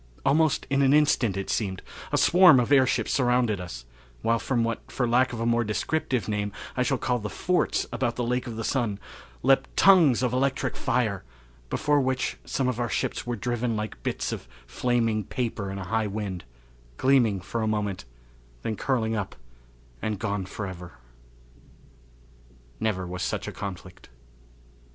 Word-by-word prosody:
Almost 155 0 +3
in 140 0 +3
an 135 0 +4
instant, 140 -9 +3
it 100 - -3
seemed, 95 -4 -2 0.3
a - - +2
swarm 175 -5 +7
of 125 +2 0
airships 130 -3 +3
surrounded 120 -6 +2
us, - - -8 0.4
while 115 0 +2
from 120 -3 0
what, 115 0 -4
for 125 - 0
lack 125 +2 +3
of 120 - -5
a 115 - -1
more 120 0 +2
descriptive 120 +1 -1
name, 105 -1 -1 0.2
I 125 - 0
shall 135 +1 +1
call 125 0 0
the 105 -1 -5
forts 180 +9 0
about 120 -1 -1
the 125 - -2
Lake 125 +2 -1
of 115 - -5
the 115 - -4
Sun, 115 -7 0 0.5
leaped 135 +1 +2
tongues 165 -11 +6
of 125 -1 +1
electric 135 +1 0
fire, 110 -7 0 0.5
before 145 -1 +2
which 130 -1 -1
some 135 - -1
of 125 -2 -1
our 120 -1 -1
ships - - -2
were 120 - -1
driven 120 +1 -1
like 105 - -5
bits - - -2
of - - -6 0.2
flaming 115 - 0
paper 110 -2 -3
in 95 - -5
a 95 - -5
high 110 +3 0
wind, 100 - -4 0.5
gleaming 120 -7 +3
for 115 +5 -4
a 110 - 0
moment, 105 -6 -2 0.6
then 110 - -2
curling 115 -2 0
up 100 -3 -4 0.7
and 110 -1 -2
gone 100 -3 -2
forever! 95 -4 -7 1.9
Never 95 -4 -1
Was 90 0 -5
Such - - -2
a - - -3
Conflict. 95 -5 -8
115 Hz, 170 wpm, -26 LUFS, 105-130 Hz, 1.9 s, swarm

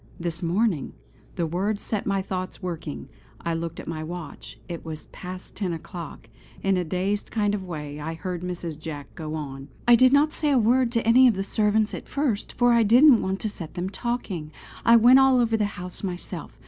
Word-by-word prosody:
This 170 -1 -2
morning! 180 -1 0 0.4
The 170 - 0
words 195 +6 -1
set 210 -3 -3
my 195 -1 0
thoughts 185 -1 -4
working. 165 - -5 0.3
I 170 - -2
looked 165 0 -4
at - - -9
my 155 -1 -4
watch; 170 +1 -8
it 170 -2 -6
was 155 -1 -7
past 185 0 -8
ten 190 -4 -2
o'clock. 165 0 -8 0.4
In 195 0 +3
a 180 - +1
dazed 185 +5 -2
kind 205 -2 0
of 200 -2 -2
way 150 -3 -6
I 160 +2 -4
heard 180 0 -4
Mrs. 175 -3 -5
Jack 150 -3 -7
go 155 -1 -5
on. 135 -3 -6 0.2
"I 240 - +8
did 255 +2 +6
not 295 +3 +4
say 300 - 0
a 280 - +4
word 240 +2 +3
to 230 -2 0
any 250 +3 +7
of 230 - +3
the 195 - -2
servants 210 +1 +1
at - - -7
first, 265 -8 -1
for 245 -1 +4
I 235 - +5
didn't 240 +4 +7
want 190 +1 -2
to 215 - -1
set 165 -6 -8
them 180 +2 -3
talking. 200 -10 -3 0.3
I 235 - +7
went 245 +3 +7
all 265 -1 +5
over 230 -2 +2
the 215 -2 +1
house 180 0 -7
myself. 180 -3 -6
190 Hz, 210 wpm, -25 LUFS, 170-230 Hz, 0.4 s, I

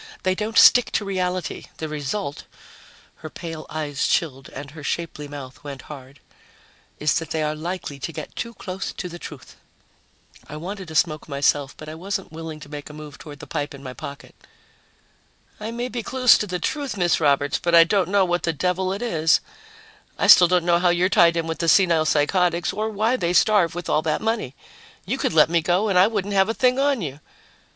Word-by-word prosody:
They 185 - +2
don't 215 +3 -3
stick 245 - +7
to 205 - 0
reality. 185 -2 -3
The 160 - -4
result 150 +2 -4 0.4
" - - -25
her 155 - -9
pale 165 -1 -8
eyes 150 -2 -2
chilled 135 -5 -1
and 140 +1 -9
her 155 0 -11
shapely 150 -1 -4
mouth 140 -3 -10
went 140 -2 -8
hard 135 -2 -11 0.8
"is 150 -1 +1
that 165 -1 -8
they 160 -1 -1
are 150 0 -1
likely 155 -2 -5
to 150 - -4
get 155 -2 -8
too 235 0 -5
close 185 0 -5
to 180 - -5
the 175 0 -9
truth." 150 -6 -11 0.9
I 150 - -7
wanted 185 +2 -7
a 160 - -8
smoke 155 -2 0
myself, 140 0 0
but 155 - -10
I 155 - -6
wasn't 190 +3 -5
willing 160 -1 -7
to 145 - -10
make 145 0 -8
a - - -10
move 150 -1 -10
toward 150 -2 -10
the - - -10
pipe 145 -3 -4
in 140 - -13
my 130 -2 -7
jacket. 140 +2 -9 1.3
"I 215 +1 -5
may 240 +2 -3
be 245 -1 -4
close 255 +1 +4
to 210 - -2
the 180 -1 -2
truth, 270 - -3
Miss 175 -2 +2
Roberts, 145 -2 +2
but 170 -1 +1
I 165 - +9
don't 185 +2 +1
know 200 -1 +3
what 175 0 0
the 165 - -1
devil 180 +4 -1
it 200 +5 -5
is. 160 -8 +2 0.8
I - - +1
still 180 - +9
don't 180 -1 +2
know 175 -1 +3
how 180 0 +3
you're 175 +2 +2
tied 170 -3 +4
in 165 - -1
with 160 0 -4
the 165 - +1
senile 170 -3 +4
psychotics 170 +3 +1
or 215 +1 -2
why 220 +4 0
they 175 -6 -1
starve 180 -4 +3
with 175 - -5
all 155 - +2
that 155 -1 -1
money. 220 - -2 0.5
You 250 +8 -2
could - - 0
let 155 -1 +6
me 170 0 +1
go 180 +6 +1
and 185 -2 +3
I 185 - +6
wouldn't 205 -2 -2
have 195 +1 +3
a 225 - -1
thing 255 0 +2
on 275 -6 +1
you." 140 -2 -6
170 Hz, 215 wpm, -23 LUFS, 150-195 Hz, 1.3 s, I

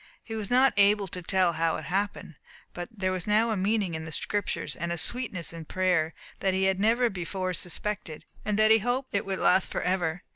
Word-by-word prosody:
He 225 - -8
was 215 -3 -4
not 260 +2 +5
able 200 0 +4
to 180 - -5
tell 180 -1 +2
how 165 0 +1
it - - -7
happened, 195 -1 -2 0.4
but 175 0 -6
there 190 -4 -2
was 185 0 -4
now 220 +2 +3
a - - +1
meaning 200 -1 0
in 160 0 -4
the 160 - -7
Scriptures, 205 +6 -2
and 170 +1 -3
a 170 - -2
sweetness 200 -5 +1
in 165 -1 -8
prayer, 180 -3 0 0.2
that 190 -1 +1
he 190 - +1
had 190 0 +2
never 230 +4 +3
before 185 -1 -3
suspected, 180 -2 -5 0.2
and 210 -1 -1
that 215 0 +5
he 220 - +7
hoped 250 +4 -2
it 200 -1 -1
would 190 -1 -1
last 185 0 +3
for - - -3
ever. 180 -2 -1
190 Hz, 220 wpm, -27 LUFS, 175-210 Hz, 0.4 s, he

